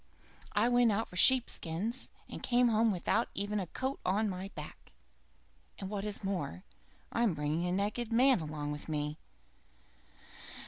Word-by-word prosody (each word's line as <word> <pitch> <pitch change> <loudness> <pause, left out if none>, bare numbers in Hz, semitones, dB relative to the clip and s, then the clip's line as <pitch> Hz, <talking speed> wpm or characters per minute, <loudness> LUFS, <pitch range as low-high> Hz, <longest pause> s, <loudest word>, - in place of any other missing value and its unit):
I 210 +3 +3
went 245 -1 +4
out 220 +3 -1
for - - -12
sheep 255 +6 +5
skins 205 +10 0 0.2
and - - -8
come 245 0 +3
home 225 0 +3
without 210 +5 +1
even 205 +1 -1
a 185 - -3
coat 265 +9 -3
to 200 +4 +1
my 195 -2 -3
back, 150 - -9 0.8
and 195 0 -6
what 200 -2 -3
is 210 0 -2
more, 185 -3 -3 0.5
I'm 230 -7 +1
bringing 150 +4 -1
a - - -1
naked 210 +5 -1
man 255 +1 +5
along 150 -2 -4
with 150 +2 -7
me. 150 0 -2
200 Hz, 155 wpm, -32 LUFS, 170-230 Hz, 0.8 s, sheep